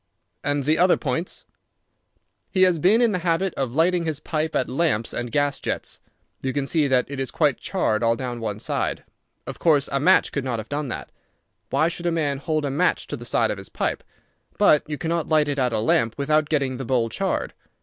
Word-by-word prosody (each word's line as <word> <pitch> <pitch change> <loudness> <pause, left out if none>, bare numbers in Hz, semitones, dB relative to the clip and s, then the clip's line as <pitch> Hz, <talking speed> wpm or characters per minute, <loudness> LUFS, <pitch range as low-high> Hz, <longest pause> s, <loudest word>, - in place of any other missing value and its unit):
"And 145 -1 0
the 155 +2 +2
other 180 +1 +5
points?" 160 +5 -3 1.0
"He 185 - +3
has 180 -3 +4
been 210 +9 +4
in 235 - +3
the 185 - -1
habit 175 +2 0
of 130 -2 -3
lighting 170 +2 +3
his 155 -2 -2
pipe 155 0 -2
at 130 - +1
lamps 130 -6 0
and 120 -1 -3
gas 145 +1 +1
jets. - - -4 0.4
You 130 -1 -2
can 140 -1 -1
see 150 0 +2
that 130 -2 +2
it 140 -1 -6
is 135 - -2
quite 150 -5 +1
charred 110 - 0
all 115 0 +3
down 125 -1 -5
one 105 -2 -4
side. - - -2 0.4
Of - - -7
course 150 -4 +3
a 140 - +1
match 145 - +4
could 140 - -2
not 125 -3 -2
have 110 0 -7
done 145 0 -2
that. - - -6 0.6
Why 160 - +2
should 175 0 -3
a - - +2
man 145 -4 -1
hold 155 +1 -1
a 140 - -1
match 140 - +1
to - - -3
the - - -10
side - - +1
of - - -4
his - - -8
pipe? - - -2 0.5
But 150 - +5
you 150 - -3
cannot 165 +1 -2
light 155 -2 +3
it 145 -1 -1
at 125 -2 +1
a - - 0
lamp 115 +1 +1
without 150 +1 +1
getting 135 -4 0
the 135 - -5
bowl 120 -2 +1
charred. - - -2
145 Hz, 220 wpm, -23 LUFS, 130-165 Hz, 1.0 s, other